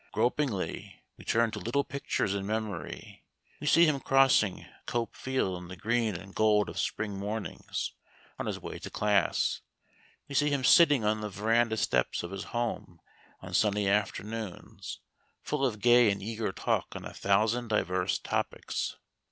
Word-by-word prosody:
Gropingly 120 -1 -1
we - - -14
turn 115 0 +2
to 105 - -5
little 120 +8 0
pictures 135 -7 -2
in 100 -1 -2
memory. 105 -7 -5 0.4
We 150 - -5
see 170 +3 +7
him 150 -3 +2
crossing 135 -8 +3 0.2
Cope 120 -1 -2
Field 95 -9 -1
in 90 - -9
the 90 - -8
green 110 +2 0
and 95 +3 -9
gold 105 -1 +3
of - - -5
spring 105 -2 -2
mornings, 105 +2 -4 0.5
on - - -3
his - - -3
way - - -7
to - - -7
class. 105 -3 +1 0.7
We - - -8
see 145 +2 +3
him 140 -2 0
sitting 145 -5 +6
on 110 0 +1
the 105 - -3
verandah 110 +3 +1
steps 65 - +1
of 85 - -6
his 95 -1 -5
home 120 -7 -3 0.4
on - - -9
sunny 105 -1 +2
afternoons, 105 0 -3 0.4
full - - -2
of 115 -6 0
gay 120 0 +6
and 100 - 0
eager 110 0 -3
talk - - -1
on - - -6
a - - -7
thousand 110 +5 +1
diverse 95 -4 0
topics. - - -3
110 Hz, 160 wpm, -29 LUFS, 100-120 Hz, 0.7 s, see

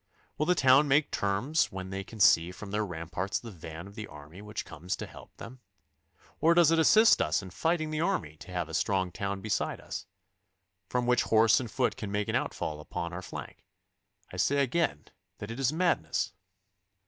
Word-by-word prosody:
Will 150 - -1
the 180 - +4
town 135 0 +5
make 145 +2 +3
terms 105 +11 0
when 95 0 -6
they 95 0 -4
can 110 +3 -12
see 85 -3 +5
from 100 +2 -9
their 105 +1 0
ramparts 90 +1 -3
the 115 - -9
van 80 -1 -9
of 100 - -12
the 105 -1 -7
army 75 +6 -12
which 105 0 -6
comes 85 +5 -4
to - - -6
help - - -14
them? 125 +3 -10 0.8
Or 165 +1 +4
does 170 -2 +6
it 165 - +3
assist 220 +7 +6
us 80 +6 +1
in 95 - -9
fighting 155 - 0
the 155 0 -1
army 125 - -1
to 85 - -12
have 90 -2 -2
a 80 - -10
strong 95 0 0
town 100 +1 -3
beside 110 0 -1
us, - - -7 0.8
from 125 -1 0
which 125 0 +3
horse 110 0 +4
and 120 -3 -5
foot 125 +2 0
can 100 -2 -5
make 105 0 -1
an - - -1
outfall 75 -1 -2
upon 85 +3 -5
our 90 - -5
flank? 85 - -9 0.7
I - - -6
say 140 +8 +2
again 135 - 0 0.3
that 105 - -7
it 115 - -6
is 135 0 +2
madness. 165 - 0
105 Hz, 200 wpm, -29 LUFS, 90-135 Hz, 0.8 s, does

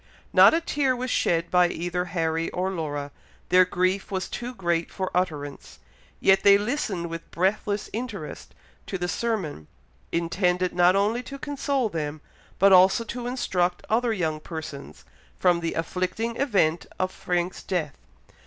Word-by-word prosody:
Not - - +8
a 335 - +1
tear 280 -5 +1
was 255 +1 -3
shed 170 0 +1
by 180 -1 +5
either 175 +1 -2
Harry 165 -2 -1
or 185 +1 -2
Laura, 145 -5 -4 0.4
their 185 +1 +6
grief 185 +2 0
was 190 -1 -2
too 245 +1 -6
great 170 -4 0
for 190 -1 -4
utterance; 150 -6 -3 0.4
yet 195 0 +4
they 200 0 +7
listened 205 -5 -2
with 165 0 -7
breathless 200 +3 0
interest 205 - -6 0.3
to 190 - -3
the 175 -1 -2
sermon, 180 - -2 0.4
intended 180 +1 0
not 175 +1 +4
only 210 +5 +1
to 275 +2 -8
console 280 -3 -1
them, 155 -5 -4 0.4
but 195 0 +6
also 190 +5 +6
to 240 +2 -5
instruct 180 -8 -1
other 235 +1 +2
young 160 -7 -1
persons, 155 -3 -8 0.3
from 175 -2 +3
the 165 -1 -3
afflicting 185 +7 -2
event 195 - +1
of 185 0 -1
Frank's 175 0 -2
death. 165 - -3
185 Hz, 150 wpm, -25 LUFS, 170-215 Hz, 0.4 s, Not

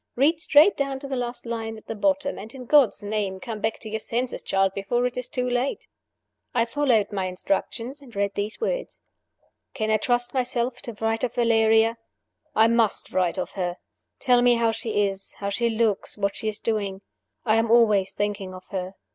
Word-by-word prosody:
Read 300 +6 +3
straight 310 +5 +6
down 275 -1 -1
to 275 +1 -7
the 270 - -3
last 245 0 -4
line 225 -1 -4
at 215 - -15
the - - -4
bottom, 285 +5 0
and, 220 +5 -10
in 255 -1 -8
God's 270 -6 +4
name, 205 -2 -2
come 220 0 -6
back 220 0 0
to - - -10
your 220 +1 -2
senses, 240 +3 -2
child, 195 0 +1
before 240 +6 0
it 250 - -2
is 250 -1 -3
too 250 -1 -1
late!" 250 +2 -1 0.7
I 230 -1 +3
followed 235 -5 +1
my 195 -2 -1
instructions, 230 +8 -3
and 250 -6 -15
read 200 0 0
these 205 +2 -3
words: - - -3 0.8
"Can 220 -4 -1
I 215 - +4
trust 245 +2 0
myself 250 -1 0
to 235 - -6
write 225 +2 -1
of 245 -1 -1
Valeria? 225 -1 +3 0.6
I 220 - +6
must 230 -2 +2
write 180 -2 +1
of - - -3
her. 180 -2 -3 0.4
Tell 250 -2 +4
me 245 0 +5
how 230 -1 +2
she 220 -2 0
is, 195 0 -7
how 200 - -4
she 235 +4 +1
looks, 220 -3 0
what 200 -1 -1
she 220 - -4
is 215 0 -1
doing. 200 -4 -2 0.4
I 220 -1 +4
am 225 0 +1
always 215 -5 +4
thinking 200 -2 -3
of 185 - -11
her. 190 -1 -4
225 Hz, 200 wpm, -25 LUFS, 205-245 Hz, 0.8 s, straight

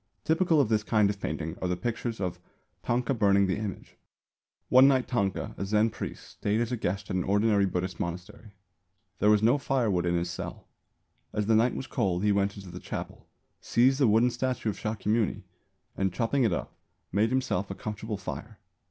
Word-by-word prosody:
Typical 165 0 +3
of 140 - +4
this 110 -1 +2
kind 105 -1 +2
of 100 - -8
painting 80 +1 -3
are 90 - 0
the 90 0 -1
pictures 115 +2 -3
of 90 -2 -3 0.4
"Tanka 125 +2 0
burning 100 -4 +4
the 95 -1 0
Image." 105 -3 -6 0.7
One 130 +2 +7
night 130 -2 +3
Tanka, 100 -7 -1
a - - -1
Zen 105 +2 +2
priest, - - -7
stayed 105 +2 -1
as 120 0 -1
a - - +1
guest 100 -2 -3
at - - -1
an 90 - +1
ordinary 100 0 +3
Buddhist 90 -1 -3
monastery. 90 +3 -6 0.6
There 105 - +4
was 105 0 +4
no 120 +6 +4
firewood 110 -11 0
in 85 - +1
his 85 0 -1
cell. - - -7 0.7
As 105 - 0
the 110 - +3
night 115 +3 +3
was 135 - -4
cold 90 -6 -1
he 105 - +3
went 100 0 +1
into 95 -3 -9
the 90 - -7
chapel, - - -7 0.3
seized 130 +4 +2
a 130 - +6
wooden 115 +3 +4
statue 125 -2 -1
of 105 - -5
Shākyamuni 110 0 -1 0.5
and, 95 -1 0
chopping 120 +6 +1
it 110 - +2
up, 85 - -4 0.4
made 105 +4 +2
himself 125 -7 -1
a 95 - -5
comfortable 105 +1 -5
fire. 95 - -7
105 Hz, 195 wpm, -28 LUFS, 95-120 Hz, 0.7 s, One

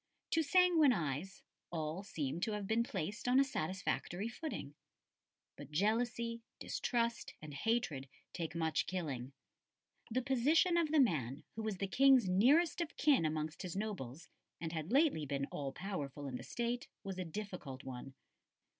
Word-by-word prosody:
To 325 - +4
sanguine 325 -3 +5
eyes 165 - -3 0.3
all 160 +1 -2
seemed 165 -5 -3
to 215 - 0
have 210 -1 -3
been 220 +3 +2
placed 210 -1 -3
on 250 +2 +5
a - - +7
satisfactory 185 -2 -2
footing; 235 - -5 0.8
but - - -10
jealousy, 230 +6 0 0.2
distrust, 235 -2 -1
and 150 -1 -9
hatred 140 - 0 0.2
take 165 -1 -4
much 160 -1 +1
killing. 140 -9 -3 0.8
The 250 +3 0
position 285 +7 +4
of 335 -2 +3
the 315 - +5
man 150 - +2
who 225 - -3
was 215 -3 -2
the 195 - -1
King's 265 +2 +5
nearest 275 - +4
of 335 - -4
kin 280 - +4
amongst 155 +1 -2
his 180 -1 -5
nobles, 180 - -4 0.3
and 165 -1 -3
had 160 +3 -4
lately 275 - +3
been 140 0 -1
all 140 -2 -3
powerful 145 -5 -5
in 130 - -4
the - - -8
State, 240 +1 -2 0.2
was 190 -1 -5
a - - 0
difficult 175 -7 -6
one. 130 +1 -7
195 Hz, 155 wpm, -36 LUFS, 155-245 Hz, 0.8 s, a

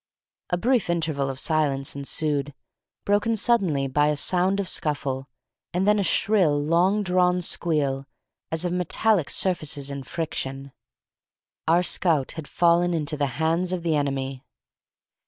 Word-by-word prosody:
A 175 - +1
brief 240 0 +1
interval 155 -5 0
of 135 0 -5
silence 145 -4 0
ensued, 140 0 -1 0.5
broken 205 +3 +2
suddenly 195 -11 +1
by 145 +2 +2
a 150 - +1
sound 185 +6 +1
of 195 - -2
scuffle, 135 -5 -1 0.5
and 190 +2 +1
then 210 0 +4
a - - +1
shrill, 185 -7 +2
long 175 +7 +2
drawn 180 -1 +2
squeal, 140 -6 -1 0.4
as 160 +2 0
of 175 - -1
metallic 180 0 +1
surfaces 150 -6 -1
in 140 0 -5
friction. 135 -2 -4 1.0
Our 170 +2 +4
scout 165 -5 +1
had 160 -3 -8
fallen 175 0 +2
into 155 -1 -2
the 145 -1 0
hands 165 +3 +1
of 180 -2 -3
the 165 -2 +1
enemy! 135 -2 -2
160 Hz, 140 wpm, -24 LUFS, 140-180 Hz, 1.0 s, then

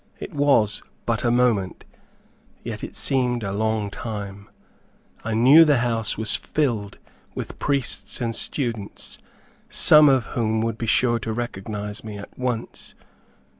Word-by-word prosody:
It 195 - -8
was 140 -8 +2 0.2
but 115 -2 -1
a 120 - +2
moment, 120 -6 +1 0.8
yet - - -6
it - - -7
seemed 125 -3 0
a 100 - -3
long 110 0 -1
time. 100 -2 -7 0.7
I 110 0 -2
knew 135 +8 +8
the 150 -4 +4
house 115 -2 -1
was 110 -2 0
filled 115 -9 -2 0.4
with - - -6
priests 140 -4 -1
and 115 -2 -2
students, 115 -6 -3 0.5
some 150 -1 +7
of 130 -3 +3
whom 110 -2 0
would 115 -1 -3
be 115 - -3
sure 120 +1 +2
to 110 - -4
recognize 105 -2 -5
me 105 -2 -7
at 100 - -11
once. 125 -3 -4
115 Hz, 140 wpm, -23 LUFS, 105-125 Hz, 0.8 s, knew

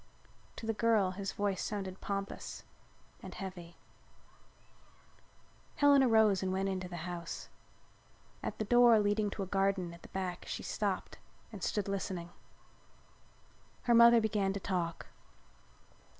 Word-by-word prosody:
To - - -7
the 225 - 0
girl 215 -4 +2
his 195 +1 -4
voice 200 -2 -1
sounded 195 -3 -4
pompous 200 0 -5 0.6
and - - -9
heavy. 180 -3 -8 2.0
Helen 285 -1 +6
arose 220 -6 +4
and 190 -1 -1
went 190 +1 0
into 185 -1 -3
the 175 -1 -6
house. 175 -2 -6 0.9
At - - -4
the 215 - -2
door 240 0 +6
leading 205 0 +1
to 200 0 -4
a - - -3
garden 195 -2 0
at 170 - -13
the - - -12
back 185 -2 -4
she - - -4
stopped - - -3 0.3
and - - -9
stood 205 -2 -1
listening. 185 -3 -3 1.5
Her 240 - +3
mother 235 0 +8
began 205 -3 0
to 200 - -3
talk. 175 -3 -2
195 Hz, 135 wpm, -33 LUFS, 185-215 Hz, 2.0 s, mother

